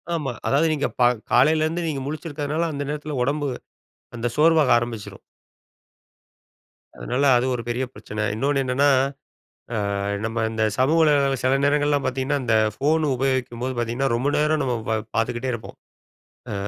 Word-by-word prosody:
ஆமா. 150 -5 -3
அதாவது, 145 +4 +3
"நீங்க 145 -2 0
பா 120 - +6 0.2
காலையிலேருந்து 155 +6 +3
நீங்க 140 -3 -2
முழிச்சிருக்கிறனால, 155 +1 -3
அந்த 140 0 -3
நேரத்தில 150 -1 -4
உடம்பு, 145 +2 -1 0.7
அந்த 115 +1 -2
சோர்வாக 155 -3 +4
ஆரம்பிச்சுரும்." 120 -3 -5 1.8
அதுனால, 125 - -2
அது 120 - 0
ஒரு 120 - -4
பெரிய 120 +2 -1
பிரச்சன. 105 0 -5
இன்னொன்னு 135 +4 +1
என்னன்னா. 130 +3 +2 0.9
அ, - - -1 0.5
நம்ம 115 0 -1
இந்த 110 0 -2
சமூகலகங்கள 145 -1 +3
சில 130 +1 +2
நேரங்கள்லா 145 0 +2
பாத்தீங்கன்னா, 130 +3 -1
இந்த 115 -2 +2 0.2
ஃபோன் 155 +6 +1
உபயோகிக்கும்போது 130 -1 -1
பாத்தீங்கன்னா, 120 +3 0
ரொம்ப 125 +4 0
நேரம் 150 0 +2
நம்ம 125 -2 0
பா-பாத்துக்கிட்டே 115 +3 -1
இருப்போம். 120 -2 -7 0.7
அ, - - -3
135 Hz, 135 wpm, -23 LUFS, 120-150 Hz, 1.8 s, பா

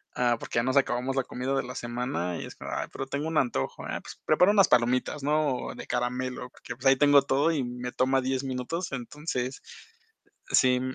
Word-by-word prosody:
ah, 120 -2 +2
porque 115 - -2
ya - - +1
nos 130 +2 +1
acabamos 130 0 +1
la 135 - +1
comida 130 +3 -3
de 135 - +1
la 125 0 -7
semana, 120 -8 -3
y - - -5
es - - -10
como: - - -7
"Ay, - - -2
pero 135 - -5
tengo 145 +3 -3
un 160 - -1
antojo, 120 - 0
ah, - - -3
pues, - - -11
prepara 180 +6 +5
unas 195 -4 +5
palomitas", 125 +4 +2
¿no? 150 -3 0
De - - -9
caramelo, 125 +1 -2
que, - - -6
pues, 125 +3 -13
ahí 135 0 +7
tengo 145 -1 +6
todo, 140 +4 +2
y 145 -5 0
me 125 0 -5
toma 130 +1 +2
10 130 +1 -1
minutos. 135 +7 -3
Entonces, 130 0 -4 0.9
sí, 125 -1 +4
130 Hz, 210 wpm, -28 LUFS, 125-140 Hz, 0.9 s, ahí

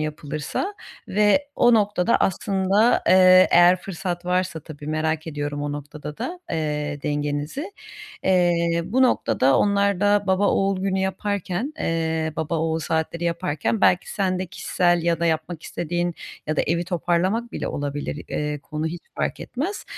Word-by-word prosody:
yapılırsa 155 - -4 0.3
ve 210 +8 +3
o 240 -1 +5
noktada 205 0 +2
aslında, 195 +4 +2
eee, 185 0 +7
eğer 175 +1 +6
fırsat 180 -2 -5
varsa 180 -2 -1
tabii. 150 -1 -11
Merak 155 +1 -1
ediyorum 145 -1 -4
o 145 - -2
noktada 145 +1 -8
da, 355 +1 -5
eee, 150 -2 -2
dengenizi. 145 - -3 0.5
Eee, 170 -2 +2
bu 255 +9 +1
noktada 135 - +3
onlar 200 -2 +2
da 205 0 +3
baba 190 +1 +2
oğul 195 -1 +1
günü 190 0 0
yaparken, 195 - -2
eee, 160 -1 -1
baba 160 +1 -1
oğul 160 0 0
saatleri 160 +1 -2
yaparken 170 +3 -1
belki 180 -2 +3
sen 185 -3 0
de 185 - -3
kişisel 175 0 0
ya 170 0 +1
da 170 - +2
yapmak 160 0 -2
istediğin 175 +1 -2 0.3
ya 155 0 -1
da - - +3
evi 170 +3 0
toparlamak 185 +7 0
bile - - -3
olabilir. 145 +1 -4
Eee, 150 0 -2
konu 150 +2 -4
hiç 170 +2 -5
fark - - -2
etmez. 330 +11 -4
175 Hz, 150 wpm, -23 LUFS, 155-195 Hz, 0.5 s, eee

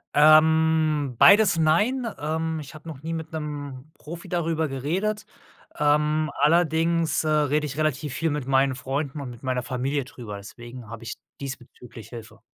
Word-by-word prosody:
Ähm, 155 -2 +4
beides 205 -4 +7
nein. 210 +11 +2
Ähm, 160 +1 -2
ich 145 0 -9
habe 155 +2 -13
noch 145 -2 -10
nie 165 +1 -3
mit 160 -1 -5
'nem 145 -2 -6
Profi 170 +2 -10
darüber 165 -2 -1
geredet. 185 +11 -2 0.5
Ähm, 150 +1 +2
allerding, 165 +1 +2 0.2
äh, - - -2
rede 150 0 +1
ich 140 +2 -7
relativ 150 -2 -1
viel 165 -2 0
mit 145 -3 -3
meinen 135 0 +3
Freunden 140 +2 -4
und 130 - -6
mit 120 0 -12
meiner 130 -1 -1
Familie 130 +2 -2
drüber, 110 -6 -8
deswegen 120 +3 -11
habe 115 0 -9
ich 115 - -6 0.2
diesbezüglich 125 -4 -9
Hilfe. 115 -2 -11
150 Hz, 160 wpm, -25 LUFS, 130-160 Hz, 0.5 s, beides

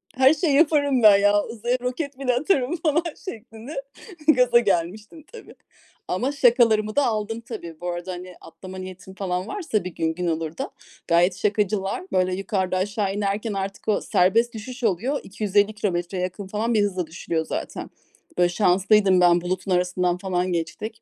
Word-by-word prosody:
her 265 +3 +6
şeyi 315 -4 +1
yaparım 285 -5 +3
ben 205 -2 +8
ya, 205 0 +3
uzaya 240 +2 -2
roket 265 +2 -4
bile 255 -2 +1
atarım 290 +1 +1
falan 320 +1 +1 0.2
şeklinde 235 - -7 0.5
gaza 250 -5 +5
gelmiştim 210 - -2
tabii. - - -12 0.5
Ama 245 +10 -1
şakalarımı 230 -5 +3
da 285 -2 +3
aldın 225 0 -2
tabii. 170 -9 -8
Bu 175 - -3
arada, 175 +1 -4
hani, 180 0 -8
atlama 185 +3 -11
niyetin 185 0 -9
falan 185 0 -3
varsa 330 - -2
bir 180 -2 -7
gün 160 0 0
gün 175 +1 -3
olur 160 0 -2
da, - - -4 0.4
gayet 175 +2 +3
şakacılar. 205 -2 0
Böyle, 185 -1 +1
yukarıda, 190 -1 -1
aşağı 200 +1 -1
inerken, 205 +2 -2
artık 195 +1 -5
o 215 - +2
serbest 230 +7 +2
düşüş 245 +3 -8
oluyor, 230 +8 0
250 205 +1 +1
kilometreye 180 -2 -2
yakın 185 +2 -5
falan 220 +4 -1
bir 215 - +3
hızla 185 -4 -2
düşülüyor 160 -1 -3
zaten. - - -5 0.5
Böyle, 175 0 +4
şanslıydım 190 0 +3
ben, 175 -1 +5
bulutun 185 +1 -3
arasından 180 0 +1
falan 185 -1 -1
geçtik. 210 +6 -4
205 Hz, 165 wpm, -23 LUFS, 180-235 Hz, 0.5 s, ben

